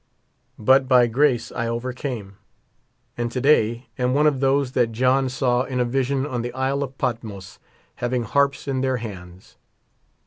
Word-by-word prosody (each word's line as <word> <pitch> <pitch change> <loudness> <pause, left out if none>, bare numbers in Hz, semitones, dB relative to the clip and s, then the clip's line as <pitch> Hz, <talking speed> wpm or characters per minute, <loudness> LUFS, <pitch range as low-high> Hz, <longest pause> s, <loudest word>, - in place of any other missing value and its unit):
But 130 +4 +4
by 125 -2 +6
grace 125 +1 +1
I 115 - -3
overcame; 120 -4 -5 0.8
and 120 0 -1
to 125 - -2
day 120 -4 +2
am 125 +1 +1
one 150 +1 +3
of 145 -3 +2
those 135 -1 +1
that 120 -3 +1
John 130 +3 +2
saw 125 -1 +1
in 130 -1 -3
a 125 - +2
vision 135 +2 0
on 125 -4 -3
the 120 +1 -4
Isle 135 +2 -1
of 135 -1 -5
Patmos 110 -6 -4 0.4
having 120 0 -1
harps 140 +5 0
in 135 -2 -1
their 130 -1 0
hands. 95 -5 -10
125 Hz, 165 wpm, -23 LUFS, 120-135 Hz, 0.8 s, by